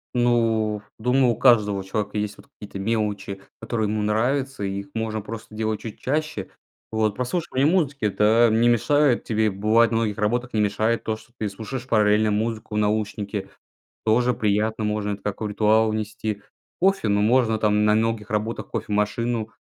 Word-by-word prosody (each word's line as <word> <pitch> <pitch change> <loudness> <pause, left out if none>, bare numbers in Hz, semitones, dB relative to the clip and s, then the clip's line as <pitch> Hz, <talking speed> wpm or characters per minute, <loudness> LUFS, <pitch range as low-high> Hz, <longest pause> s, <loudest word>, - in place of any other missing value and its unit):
Ну, 115 -3 +1 0.2
думаю, 125 +3 +2
у - - -9
каждого 105 -6 +4
человека 105 +2 -3
есть, 105 -1 -3
вот, - - -17
какие-то 100 -1 -10
мелочи, 100 -2 -2 0.2
которые 115 -1 -1
ему 105 0 -1
нравятся, 125 +4 0
и 100 0 -2
их 100 - -8
можно 110 -1 -2
просто 110 +1 -9
делать 110 0 -2
чуть 110 - -8
чаще. 150 -7 -2 0.4
Вот. 110 -2 0
Прослушивание 130 +1 0
музыки- 145 - 0
это 110 +3 +4
не 115 +2 +4
мешает 135 +3 +3
тебе. 110 -1 +1
Бывает, 110 +4 +3
на 115 - +1
многих 110 -3 -1
работах 120 +4 -1
не 110 - +2
мешает 110 +3 0
то, 110 - -1
что 110 +2 -17
ты 110 - -2
слушаешь 115 +5 -6
параллельно 105 -2 +3
музыку 110 +1 -2
в - - 0
наушнике. 105 -1 -2 0.6
Тоже 120 +3 +3
приятно. 110 +1 0
Можно 105 -1 -1
это 100 - -7
как 105 -1 -4
в 110 - -2
ритуал 110 +1 +3
внести. 110 -1 -3 0.4
Кофе? 195 - +2
Ну, 100 0 +2
можно 110 0 +3
там, 105 0 +2
на 105 - +4
многих 110 -1 0
работах- 110 +2 -2
кофемашину. 110 +2 -1
110 Hz, 170 wpm, -23 LUFS, 105-115 Hz, 0.6 s, каждого